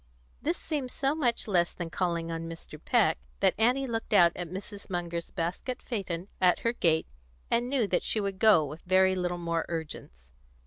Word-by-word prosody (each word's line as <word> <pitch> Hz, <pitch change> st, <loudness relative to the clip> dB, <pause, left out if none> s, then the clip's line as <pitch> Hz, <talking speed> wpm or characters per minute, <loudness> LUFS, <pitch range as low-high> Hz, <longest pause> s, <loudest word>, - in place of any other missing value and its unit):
This 335 Hz, +3 st, 0 dB
seemed 290 Hz, -5 st, -3 dB
so 275 Hz, +2 st, 0 dB
much 250 Hz, -9 st, 0 dB
less 175 Hz, -4 st, +2 dB
than 170 Hz, -2 st, -6 dB
calling 170 Hz, -2 st, -1 dB
on 165 Hz, 0 st, -4 dB
Mr. 165 Hz, 0 st, -10 dB
Peck -, -, +3 dB, 0.2 s
that -, -, +4 dB
Annie 250 Hz, +4 st, +3 dB
looked 225 Hz, -3 st, -3 dB
out 175 Hz, -4 st, +7 dB
at 175 Hz, -2 st, -5 dB
Mrs. 200 Hz, +3 st, -8 dB
Munger's 170 Hz, -2 st, -3 dB
basket 180 Hz, +9 st, -3 dB
phaeton 190 Hz, -6 st, -4 dB
at 180 Hz, -1 st, +4 dB
her 230 Hz, -, +1 dB
gate, 160 Hz, -8 st, +2 dB, 0.5 s
and 240 Hz, +1 st, +2 dB
knew 265 Hz, -4 st, +2 dB
that 185 Hz, -3 st, +1 dB
she 220 Hz, -, +1 dB
would 195 Hz, -2 st, -2 dB
go 210 Hz, -9 st, +6 dB
with 150 Hz, +3 st, -8 dB
very 190 Hz, +1 st, +4 dB
little 180 Hz, -1 st, -1 dB
more 170 Hz, -1 st, -1 dB
urgence. 65 Hz, -, -6 dB
185 Hz, 185 wpm, -29 LUFS, 170-225 Hz, 0.5 s, out